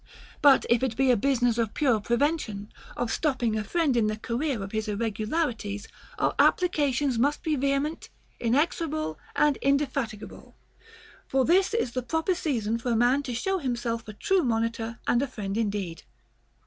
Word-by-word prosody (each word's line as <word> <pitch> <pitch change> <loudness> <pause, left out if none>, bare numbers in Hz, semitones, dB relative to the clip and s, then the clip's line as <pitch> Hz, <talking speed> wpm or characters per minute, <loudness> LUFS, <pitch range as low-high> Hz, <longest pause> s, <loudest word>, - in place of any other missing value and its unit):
But 280 -2 +6
if 235 -1 +3
it 255 -4 -1
be 265 -1 +4
a - - +5
business 245 0 +1
of 225 -2 -1
pure 255 -7 +2
prevention, 235 -3 -1 0.2
of 245 -2 -1
stopping 255 -8 0
a 215 - -1
friend 310 - +1
in 225 -3 +3
the 215 0 -2
career 240 0 -2
of 195 - -7
his 220 -1 -2
irregularities, 215 0 -2 0.3
our - - +1
applications 290 -7 +2
must 285 +4 +1
be 315 -3 +1
vehement, 275 +3 -1 0.3
inexor 290 +8 +1
able, 305 - -3 0.2
and 295 -2 +3
indefatigable; 275 -6 -2 0.7
for 265 -1 +2
this 375 +6 +3
is 460 - 0
the 255 - -2
proper 320 +8 0
season 230 - -1
for 245 - -3
a - - +2
man 245 +5 +3
to 255 -4 -5
show 385 - -1
himself 240 -5 -3
a 215 - -7
true 385 - +1
monitor 230 -2 -1
and 240 - +2
a 280 - 0
friend 205 -6 -5
indeed. 200 -6 -2
245 Hz, 170 wpm, -27 LUFS, 225-290 Hz, 0.7 s, But